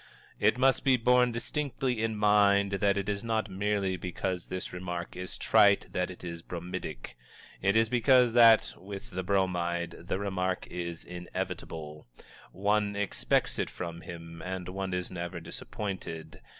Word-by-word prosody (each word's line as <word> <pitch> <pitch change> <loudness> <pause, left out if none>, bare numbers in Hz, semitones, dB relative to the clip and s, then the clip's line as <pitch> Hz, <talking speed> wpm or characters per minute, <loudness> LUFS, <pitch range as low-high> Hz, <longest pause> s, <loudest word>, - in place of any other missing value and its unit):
_" - - -22 0.4
It - - +3
must 130 +1 +3
be 130 -2 +5
borne 125 +1 +4
distinctly 125 0 -2
in 110 -1 -1
mind 100 -1 +4
that 100 0 +2
it 100 0 -2
is 100 0 -2
not 110 -3 -1
merely 100 -1 0
because 90 0 -3
this 90 0 -5
remark 90 -1 -5
is 90 0 -5
trite 100 -1 +4
that 90 -1 0
it 90 - -10
is 85 -2 -6
bromidic; 85 -8 -6 0.5
it 100 +2 +2
is 115 0 +5
because 125 0 +4
that, 115 -2 +7
with 100 +5 -9
the 95 0 -2
Bromide, 90 -3 0
the - - 0
remark 95 -2 -1
is 85 -2 -4
inevitable. 80 -4 -6 0.4
One 105 +1 +1
expects 100 -10 0
it - - 0
from 85 -1 -6
him, 85 -1 -9
and 90 -1 -4
one 95 0 -3
is 90 0 -3
never 85 -1 -4
disappointed. 85 0 -6
95 Hz, 155 wpm, -30 LUFS, 90-105 Hz, 0.5 s, that